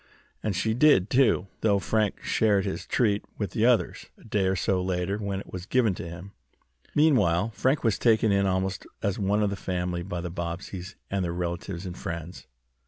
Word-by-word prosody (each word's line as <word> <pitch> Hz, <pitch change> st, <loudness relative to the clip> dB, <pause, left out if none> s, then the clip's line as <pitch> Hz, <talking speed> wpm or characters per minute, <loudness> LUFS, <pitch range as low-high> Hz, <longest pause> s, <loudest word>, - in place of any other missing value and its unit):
And 105 Hz, -3 st, -1 dB
she 110 Hz, +5 st, +1 dB
did, 120 Hz, -7 st, +4 dB
too, 125 Hz, -7 st, +4 dB
though 105 Hz, -2 st, +3 dB
Frank 105 Hz, +1 st, 0 dB
shared 105 Hz, -3 st, +2 dB
his 95 Hz, -, -4 dB
treat 105 Hz, -4 st, +1 dB
with 105 Hz, -, -3 dB
the 115 Hz, +1 st, +2 dB
others, 125 Hz, -2 st, +1 dB
a -, -, -19 dB
day 105 Hz, -3 st, 0 dB
or 95 Hz, -, +1 dB
so 95 Hz, 0 st, +1 dB
later, 90 Hz, +2 st, -1 dB
when 100 Hz, -2 st, -2 dB
it -, -, -11 dB
was 90 Hz, 0 st, -6 dB
given 120 Hz, -6 st, +3 dB
to 85 Hz, -, -6 dB
him. 90 Hz, +4 st, -9 dB, 0.6 s
Meanwhile 115 Hz, -, +3 dB
Frank 130 Hz, +9 st, +1 dB
was 110 Hz, -5 st, +1 dB
taken 110 Hz, -2 st, +4 dB
in 100 Hz, 0 st, +3 dB
almost 95 Hz, 0 st, -1 dB, 0.2 s
as 100 Hz, 0 st, 0 dB
one 105 Hz, +1 st, +2 dB
of 100 Hz, -, +1 dB
the -, -, -2 dB
family 90 Hz, -2 st, -2 dB
by 85 Hz, -1 st, -4 dB
the 85 Hz, -1 st, -5 dB
Bobbseys 90 Hz, +2 st, -5 dB, 0.2 s
and 100 Hz, -1 st, 0 dB
their 85 Hz, -, -1 dB
relatives 85 Hz, +1 st, -4 dB
and 90 Hz, -1 st, -5 dB
friends. 85 Hz, +1 st, -6 dB
95 Hz, 195 wpm, -27 LUFS, 90-110 Hz, 0.6 s, did